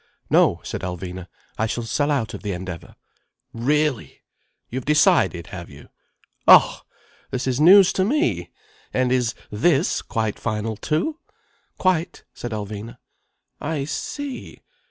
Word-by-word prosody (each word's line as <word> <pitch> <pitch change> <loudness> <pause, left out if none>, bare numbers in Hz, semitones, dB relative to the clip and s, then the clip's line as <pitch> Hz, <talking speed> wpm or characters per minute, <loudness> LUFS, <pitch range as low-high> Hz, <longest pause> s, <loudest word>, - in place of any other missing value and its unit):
"No," - - +4
said - - -5
Alvina. 90 0 -6 0.3
"I 110 - +2
shall 120 +2 -3
sell 145 +6 0
out 130 -7 0
of - - -7
the 105 -3 -3
Endeavour." 90 -1 -7 0.6
"Really! 135 - -1 0.4
You've 130 +1 -5
decided, 150 - +3
have - - -7
you? - - -14 0.6
Oh! - - +7 0.5
This 130 0 -3
is 130 +1 0
news 185 +3 +8
to 185 - +1
me. 295 - 0 0.5
And 130 -1 +2
is 125 -3 +1 0.2
this 140 - +2
quite 110 -2 -2
final, 110 0 -2
too?" 165 - -2 0.6
"Quite," 180 -2 0
said 120 - -6
Alvina. 110 +2 -6 0.6
"I 145 -2 -2
see! 270 - -6
125 Hz, 130 wpm, -22 LUFS, 110-160 Hz, 0.6 s, news